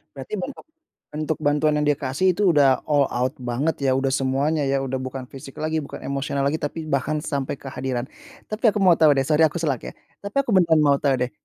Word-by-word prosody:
Berarti 135 +9 -7
bentuk 235 +9 -6 0.5
bentuk 155 +1 -2
bantuan 150 +1 +2
yang 150 - +1
dia 145 - +5
kasih 145 +8 +1
itu 205 - -3
udah 135 -3 +5
all 145 -2 +4
out 125 +2 0 0.2
banget 140 +7 0
ya, 135 - +3
udah 135 +1 +1
semuanya 140 +4 0
ya 135 0 +1
udah 135 -1 -3
bukan 130 0 -5
fisik 135 0 -10
lagi 155 +1 -1
bukan - - -9
emosional 140 0 -2
lagi, 140 +3 +1
tapi 155 +1 -5
bahkan 150 +2 0
sampai 140 -3 -3
kehadiran. 130 -2 -4 0.4
Tapi 215 +3 -6
aku 210 - -2
mau 180 -4 +5
tahu 155 -2 +5
deh, 135 - +2
sorry 155 +1 +4
aku 160 +2 +1
sela 145 -5 0
ya, - - -9 0.3
tapi 200 +6 -7
aku 265 - -2
beneran 165 -4 +4
mau 140 -2 +4
tahu 140 -1 +1
deh. 125 -1 -1
145 Hz, 220 wpm, -23 LUFS, 135-160 Hz, 0.5 s, dia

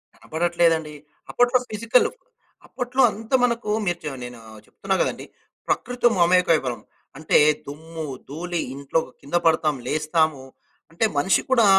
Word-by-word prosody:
కనబడట్లేదండి. 165 -1 0 0.4
అప్పట్లో 245 +1 +3
ఫిజికలు. 230 +3 +2 0.5
అప్పట్లో 250 +2 -2
అంత 220 +3 -11
మనకూ 235 -3 0
మీరు 175 -1 -1
చ 150 - -3
నేనూ 125 -1 -8 0.3
చెప్తున్నా 195 0 -3
గదండి, - - -2 0.4
ప్రకృతితో 245 -1 +1
మమేకమైపోయేవాళ్ళం. 165 -10 +3 0.4
అంటే 155 - +2 0.3
దుమ్ము, 160 +2 -7 0.2
ధూళి, 170 +3 -3
ఇంట్లో 140 +3 -1 0.2
కింద 145 +5 -5
పడతాం 155 -2 +3
లేస్తాము. 155 -2 0 0.5
అంటే, 195 +7 +1
మనిషి 180 +6 +3
కూడా 235 -4 +5
170 Hz, 115 wpm, -23 LUFS, 155-215 Hz, 0.5 s, కూడా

